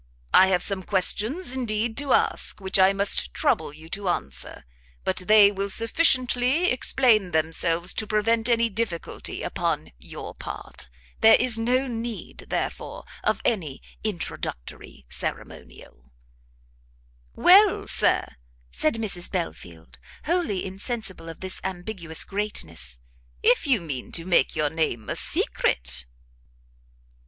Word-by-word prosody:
I 190 Hz, -, +7 dB
have 180 Hz, -2 st, +2 dB
some 195 Hz, -2 st, +1 dB
questions, 220 Hz, -, +1 dB
indeed, 225 Hz, -2 st, -2 dB
to 285 Hz, -2 st, -2 dB
ask, -, -, +2 dB
which 190 Hz, 0 st, +1 dB
I 190 Hz, +1 st, +6 dB
must 200 Hz, 0 st, +2 dB
trouble 155 Hz, -, +1 dB
you 155 Hz, +2 st, -13 dB
to 195 Hz, +1 st, -3 dB
answer, 70 Hz, -, -4 dB, 0.4 s
but -, -, -1 dB
they 205 Hz, +2 st, +6 dB
will 200 Hz, 0 st, -3 dB
sufficiently 255 Hz, -, +3 dB
explain 240 Hz, -6 st, +2 dB
themselves 165 Hz, +2 st, +1 dB
to 215 Hz, -, -1 dB
prevent 225 Hz, +2 st, +1 dB
any 230 Hz, -1 st, +3 dB
difficulty 210 Hz, -5 st, -4 dB
upon -, -, -2 dB
your 60 Hz, -, -9 dB
part. 65 Hz, -, -7 dB, 0.3 s
There 225 Hz, 0 st, +8 dB
is 245 Hz, -3 st, +1 dB
no 250 Hz, +4 st, +1 dB
need, 235 Hz, -2 st, -6 dB
therefore, -, -, -4 dB, 0.2 s
of -, -, 0 dB
any 165 Hz, -, -1 dB, 0.2 s
introductory 160 Hz, -, -5 dB
ceremonial." 60 Hz, +1 st, -6 dB, 1.3 s
"Well, 390 Hz, +2 st, +6 dB
Sir," -, -, 0 dB, 0.3 s
said 155 Hz, -, 0 dB
Mrs 200 Hz, -6 st, -1 dB
Belfield, 85 Hz, -, -6 dB, 0.3 s
wholly 300 Hz, -, -1 dB
insensible 190 Hz, -3 st, -4 dB
of 165 Hz, -, -10 dB
this 185 Hz, 0 st, -3 dB
ambiguous 175 Hz, -3 st, -3 dB
greatness, 85 Hz, -, -4 dB, 0.5 s
"if 165 Hz, -, +3 dB
you 250 Hz, -8 st, +3 dB
mean 140 Hz, -7 st, -6 dB
to 165 Hz, -, -4 dB
make 180 Hz, -1 st, +2 dB
your 150 Hz, -1 st, 0 dB
name 155 Hz, -9 st, -2 dB
a -, -, -2 dB
secret." 65 Hz, +1 st, -1 dB
195 Hz, 125 wpm, -25 LUFS, 165-230 Hz, 1.3 s, There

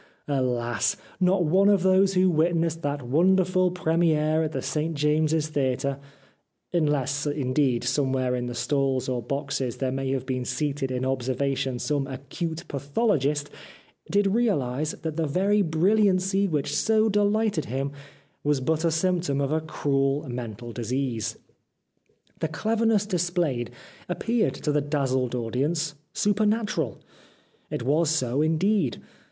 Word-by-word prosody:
Alas! 125 Hz, -4 st, 0 dB, 0.2 s
not 185 Hz, -1 st, +3 dB
one 190 Hz, +6 st, +4 dB
of 200 Hz, -3 st, +3 dB
those 190 Hz, +1 st, +4 dB
who 185 Hz, +1 st, +4 dB
witnessed 165 Hz, 0 st, +1 dB
that 145 Hz, -2 st, -2 dB
wonderful 185 Hz, +6 st, +3 dB
premiere 160 Hz, -3 st, +1 dB
at 155 Hz, -1 st, -1 dB
the -, -, -3 dB
St 160 Hz, +1 st, -2 dB
James's 155 Hz, +1 st, +1 dB
Theatre 140 Hz, -1 st, -1 dB, 0.4 s
— -, -, -46 dB
unless, 145 Hz, -3 st, +1 dB
indeed, 135 Hz, -3 st, +1 dB
somewhere 130 Hz, -3 st, 0 dB
in 125 Hz, 0 st, -3 dB
the 120 Hz, -, -5 dB
stalls 135 Hz, 0 st, 0 dB
or 125 Hz, -2 st, -1 dB
boxes 135 Hz, -1 st, -3 dB
there 130 Hz, -1 st, -1 dB
may 135 Hz, 0 st, -2 dB
have 130 Hz, -1 st, -2 dB
been 130 Hz, -1 st, -2 dB
seated 145 Hz, 0 st, -2 dB
in 130 Hz, 0 st, -2 dB
observation 130 Hz, 0 st, -1 dB
some 140 Hz, +1 st, -1 dB
acute 140 Hz, +5 st, -5 dB
pathologist 145 Hz, -, 0 dB, 0.3 s
— -, -, -30 dB
did 205 Hz, +1 st, +2 dB
realise 155 Hz, -, +1 dB
that 160 Hz, -1 st, -3 dB
the 160 Hz, -2 st, 0 dB
very 195 Hz, +7 st, +2 dB
brilliancy 195 Hz, +2 st, +2 dB
which 150 Hz, -6 st, -1 dB
so 220 Hz, 0 st, +3 dB
delighted 205 Hz, -4 st, +1 dB
him 135 Hz, +3 st, -2 dB, 0.5 s
was 145 Hz, -1 st, +2 dB
but 160 Hz, +5 st, 0 dB
a 170 Hz, -, +3 dB
symptom 165 Hz, -3 st, 0 dB
of 140 Hz, 0 st, 0 dB
a 160 Hz, +1 st, +1 dB
cruel 140 Hz, -2 st, 0 dB
mental 120 Hz, -1 st, -6 dB
disease. 120 Hz, -1 st, -2 dB, 1.0 s
The -, -, 0 dB
clever 220 Hz, +8 st, 0 dB
ness 210 Hz, -2 st, +3 dB
displayed 175 Hz, -, -1 dB, 0.4 s
appeared 225 Hz, +5 st, 0 dB
to 150 Hz, -, -2 dB
the 150 Hz, 0 st, +2 dB
dazzled 130 Hz, -4 st, 0 dB
audience 145 Hz, +7 st, -1 dB, 0.2 s
supernatural. 205 Hz, -, 0 dB, 0.7 s
It -, -, -3 dB
was 150 Hz, +5 st, +2 dB
so 135 Hz, -3 st, +1 dB
indeed. 160 Hz, -, +1 dB
150 Hz, 140 wpm, -26 LUFS, 135-180 Hz, 1.0 s, one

